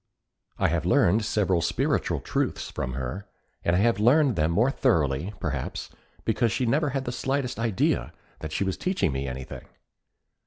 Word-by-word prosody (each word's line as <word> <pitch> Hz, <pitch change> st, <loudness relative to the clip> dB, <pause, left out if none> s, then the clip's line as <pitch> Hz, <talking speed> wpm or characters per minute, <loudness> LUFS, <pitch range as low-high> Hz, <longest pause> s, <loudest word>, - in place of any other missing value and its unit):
I -, -, +2 dB
have -, -, 0 dB
learned 105 Hz, +6 st, +3 dB
several 95 Hz, -5 st, +1 dB
spiritual 80 Hz, -, 0 dB
truths -, -, -2 dB
from 65 Hz, -, -3 dB
her, 65 Hz, +11 st, -5 dB, 0.4 s
and 85 Hz, -, +2 dB
I -, -, +3 dB
have 115 Hz, -2 st, +2 dB
learned 130 Hz, +3 st, +4 dB
them 80 Hz, -1 st, +2 dB
more 115 Hz, +10 st, +3 dB
thoroughly, 75 Hz, -, +1 dB
perhaps, 75 Hz, -7 st, -4 dB, 0.3 s
because 115 Hz, +1 st, +1 dB
she 125 Hz, -, 0 dB
never 145 Hz, +6 st, +2 dB
had 135 Hz, 0 st, -2 dB
the 120 Hz, -, -2 dB
slightest 135 Hz, -1 st, -2 dB
idea 100 Hz, -, 0 dB, 0.3 s
that 80 Hz, -, -6 dB
she 100 Hz, -, 0 dB
was 95 Hz, -1 st, -2 dB
teaching 185 Hz, -, 0 dB
me 65 Hz, 0 st, -3 dB
anything. 65 Hz, 0 st, -7 dB
100 Hz, 165 wpm, -26 LUFS, 75-120 Hz, 0.4 s, learned